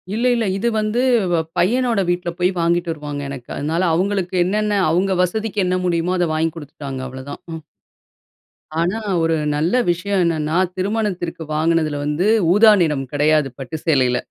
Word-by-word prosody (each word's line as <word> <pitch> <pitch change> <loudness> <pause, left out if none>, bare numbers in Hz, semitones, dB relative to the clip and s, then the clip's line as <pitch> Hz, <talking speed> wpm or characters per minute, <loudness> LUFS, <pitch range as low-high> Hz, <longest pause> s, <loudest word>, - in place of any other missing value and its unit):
இல்ல, 235 +3 0
இல்ல. 230 -2 0
இது 225 +4 -1
வந்து 215 +3 0 0.3
வ 170 - +2 0.2
பையனோட 230 +4 +2
வீட்ல 175 0 -1
போய் 180 +1 +2
வாங்கிட்டு 170 0 +1
வருவாங்க 145 -2 -5
எனக்கு. 135 -3 -8
அதனால 160 +5 -1
அவங்களுக்கு 190 0 -1
என்னென்ன 210 +2 0
அவங்க 190 +3 +1
வசதிக்கு 210 +2 -1
என்ன 180 0 +1
முடியுமோ? 175 0 0
அத 175 - +2
வாங்கி 160 +1 0
குடுத்துட்டாங்க 140 -3 -7
அவ்ளதான். 130 +2 -8
ம். 160 - -6 1.2
ஆனா, 180 +6 0 0.2
ஒரு 165 0 +2 0.2
நல்ல 155 +4 0 0.2
விஷயம் 185 +3 0
என்னென்னா 160 -2 0 0.2
திருமணத்திற்கு 185 -4 -2
வாங்குனதுல 155 -2 +1
வந்து 150 +6 0 0.3
ஊதா 215 +2 +7
நிறம் 145 -5 0
கிடையாது 150 -1 +2
பட்டு 135 +4 -6
சேலைல. 130 -6 +2
170 Hz, 150 wpm, -20 LUFS, 150-195 Hz, 1.2 s, ஊதா